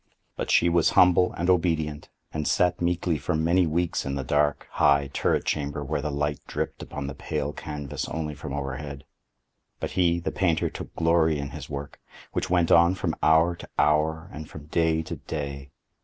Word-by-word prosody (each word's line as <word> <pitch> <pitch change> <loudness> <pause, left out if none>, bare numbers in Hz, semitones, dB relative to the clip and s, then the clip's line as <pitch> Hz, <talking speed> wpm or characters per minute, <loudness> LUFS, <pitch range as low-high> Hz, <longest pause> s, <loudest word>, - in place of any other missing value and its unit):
But - - -4
she 85 - +4
was 85 -1 +3
humble 90 0 +6
and 85 - -2
obedient, 80 -5 +1 0.2
and 75 -1 -2
sat 90 -1 +2
meekly 85 -2 0
for 90 - -1
many 85 +3 +3
weeks 85 +2 0
in 70 0 -3
the 70 - -2
dark, 75 +2 +1
high 70 -1 +3
turret - - +1
chamber 75 -1 -2
where 75 +2 -2
the 75 - -2
light 75 0 -1
dripped - - -3
upon 70 - -6
the 70 - -4
pale 75 +1 -3
canvas 75 -1 -5
only 80 -2 -3
from 70 0 -7
overhead. 70 0 -5 0.8
But - - -3
he, 85 -2 +2
the 85 - -3
painter, 85 -4 +1
took - - -8
glory 80 -2 +3
in 70 -1 -5
his - - -8
work, 70 0 -6 0.3
which - - -2
went 85 -2 +2
on 85 +2 +6
from 90 -3 -1
hour 80 +2 +4
to - - -11
hour, 80 +3 +2
and 75 0 -8
from 75 - -10
day 80 0 +1
to - - -6
day. 70 -2 -5
80 Hz, 185 wpm, -26 LUFS, 70-85 Hz, 0.8 s, humble